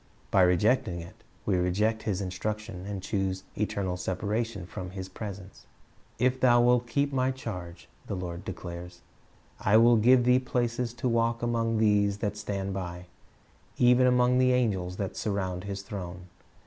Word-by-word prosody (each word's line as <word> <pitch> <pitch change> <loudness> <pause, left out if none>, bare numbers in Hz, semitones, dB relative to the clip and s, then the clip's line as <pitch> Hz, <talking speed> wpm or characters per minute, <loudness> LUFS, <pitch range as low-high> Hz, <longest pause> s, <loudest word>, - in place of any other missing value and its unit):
Ry 95 - +6
rejecting 90 +1 +3
it, 85 0 -9 0.3
we 95 -3 +2
reject 105 +5 +1
His 100 -3 -2
instruction, 95 0 -4
and 100 -2 -5
choose 95 -1 -2
eternal 100 -3 -2
separation 100 +2 -2
from 90 +1 -7
His 95 0 -6
presence. 100 0 -9 0.5
"If 130 +2 +1
thou 120 -2 +5
wilt 120 0 +3
keep 140 +4 0
My 130 -1 +2
charge," 90 -10 -6 0.2
the - - -3
Lord 90 -1 -5
declares, 90 -1 -7 0.6
"I 100 +3 +4
will 115 +1 +6
give 125 +3 +5
thee 125 +1 +5
places 120 -1 -1
to 120 +1 -2
walk 115 0 +1
among 115 -1 0
these 105 -2 +3
that 105 -1 -2
stand 100 -2 -3
by,"' 90 -2 -5 0.4
— - - -34 0.3
even 125 +1 +5
among 125 0 +4
the 130 0 +4
angels 95 -7 0
that 100 -2 -3
surround 95 -3 -2
His 100 -1 -5
throne. 90 -3 -7
105 Hz, 160 wpm, -28 LUFS, 95-120 Hz, 0.6 s, Ry